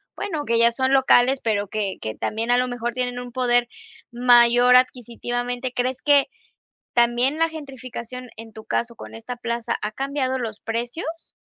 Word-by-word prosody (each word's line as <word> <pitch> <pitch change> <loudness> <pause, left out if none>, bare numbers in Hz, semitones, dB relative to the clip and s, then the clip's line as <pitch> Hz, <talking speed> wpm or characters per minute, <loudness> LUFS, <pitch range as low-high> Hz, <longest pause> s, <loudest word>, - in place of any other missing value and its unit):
bueno, 320 -8 -4
que 230 - +2
ya 235 0 +5
son 260 +3 0
locales, 265 0 +4
pero 205 -2 0
que 200 -1 -3
que 110 - -5
también 225 +2 -2
a 245 - +4
lo 250 0 0
mejor 240 -1 -3
tienen 245 0 -2
un 245 -1 -8
poder 245 -1 +2 0.4
mayor 245 0 +6
adquisitivamente, 245 0 -2
¿crees 255 +1 -2
que, 285 -2 +4 0.7
también 240 +4 +2
la 330 - +3
gentrificación 255 -5 -8
en 225 0 -10
tu 220 0 -11
caso 235 +1 -2
con - - -11
esta 225 +2 -7
plaza 235 0 -3
ha 210 - -2
cambiado 265 +2 -2
los 220 -4 -5
precios? 245 +9 -5
245 Hz, 170 wpm, -22 LUFS, 235-255 Hz, 0.7 s, mayor